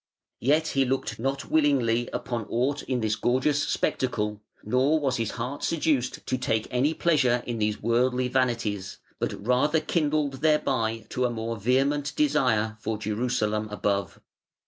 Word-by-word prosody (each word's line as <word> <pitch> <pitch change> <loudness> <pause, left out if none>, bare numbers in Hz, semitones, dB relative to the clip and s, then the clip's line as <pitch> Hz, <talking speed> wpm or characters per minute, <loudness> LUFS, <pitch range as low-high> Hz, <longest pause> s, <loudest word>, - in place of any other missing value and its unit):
Yet 155 +5 +2
he 135 - +2
looked 130 -2 -2
not 135 +3 -3
willingly 130 -6 +2
upon 120 -3 -3
aught 135 +5 0
in 125 -2 -2
this 110 -1 +1
gorgeous 130 +6 +1
spectacle, 105 -9 -1 0.2
nor 130 +8 +2
was 135 -4 0
his 115 -2 -1
heart 125 +4 -5
seduced 150 -6 0
to 130 - -1
take 110 -3 0
any 135 +6 +1
pleasure 130 -8 +2
in 120 -2 -3
these 105 0 -1
worldly 125 +2 +2
vanities, 120 -7 -1 0.2
but 100 - -3
rather 145 +6 +3
kindled 150 -4 0
thereby 115 -8 +1
to 125 - 0
a - - +2
more 115 0 -3
vehement 135 +6 +1
desire 110 - +2
for 110 0 -3
Jerusalem 110 0 -1
above. 100 -2 -2
125 Hz, 145 wpm, -26 LUFS, 110-140 Hz, 0.2 s, rather